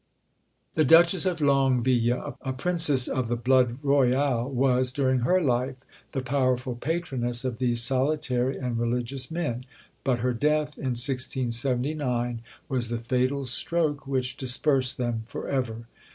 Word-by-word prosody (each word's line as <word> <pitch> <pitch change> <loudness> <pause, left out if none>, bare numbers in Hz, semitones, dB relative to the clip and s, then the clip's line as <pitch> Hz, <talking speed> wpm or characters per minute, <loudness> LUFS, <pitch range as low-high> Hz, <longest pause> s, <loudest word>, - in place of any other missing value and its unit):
The 155 - +2
Duchess 170 +5 +5
of 175 -3 -1
Longueville, 130 -3 +1
a 130 - -3
princess 150 -3 +2
of 130 -2 -1
the 120 - -1
blood 125 0 +2
royal, 135 -2 +2
was, 130 -1 +1
during 130 -1 +1
her 180 +10 +2
life, 130 -4 0 0.4
the 135 - -2
powerful 130 -1 0
patroness 130 -4 -2
of 125 -2 -3
these 120 -2 +1
solitary 130 -1 0
and 125 -3 -3
religious 125 +2 -1
men: 150 -8 -3 0.4
but 130 -2 +1
her 125 +2 -1
death, 150 +4 0
in 130 -3 -3
1679, 125 -1 -1 0.3
was 125 -5 -2
the 120 - -2
fatal 130 +4 -1
stroke 145 +4 -1
which 130 -2 -2
dispersed 130 0 +2
them 120 -2 -2
for - - -6
ever. 115 -4 -3
130 Hz, 140 wpm, -26 LUFS, 120-140 Hz, 0.4 s, Duchess